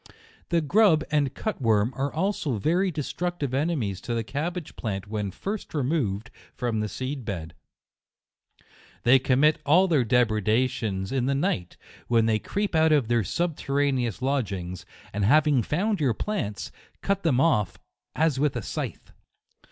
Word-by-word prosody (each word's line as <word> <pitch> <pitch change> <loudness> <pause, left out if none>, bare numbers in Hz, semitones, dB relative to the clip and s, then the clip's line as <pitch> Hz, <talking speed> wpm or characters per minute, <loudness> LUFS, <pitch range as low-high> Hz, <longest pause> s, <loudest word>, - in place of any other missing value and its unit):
The 170 -2 +2
grub 165 0 +4
and 145 -3 +1
cut 215 -9 -3
worm 110 0 +2
are 135 +2 -1
also 160 - -1
very 175 - +1
de 155 -3 -3
structive 150 -1 -3
enemies 130 - -1
to 120 - -3
the 115 - -1
cabbage 160 - -4
plant 100 -3 -4
when 105 -1 -3
first 195 - -5
removed 125 -8 -1 0.2
from 120 -3 -1
the 105 0 -2
seed 130 +6 -4
bed. 85 -6 -5 1.5
They 130 +2 +6
com 130 +1 +2
mit 155 0 +4
all 175 +7 +5
their 155 -8 +3
depredations 110 -3 +1
in 130 -2 0
the 140 - +1
night, 140 - -1 0.3
when 115 -2 +3
they 110 -1 +2
creep 205 - -2
out 160 0 +4
of 140 -7 +3
their 120 -2 +2
subterraneous 140 - -1
lodg 135 -6 0
ings, 90 -1 -6 0.3
and 100 +1 -1
having 145 +3 +4
found 195 - 0
your 125 -6 +2
plants, 185 - -3 0.3
cut 200 0 0
them 145 -8 +2
off 105 - +2 0.4
as 155 -4 +2
with 145 -2 +1
a 120 - -3
scythe. - - -5
135 Hz, 160 wpm, -26 LUFS, 110-160 Hz, 1.5 s, They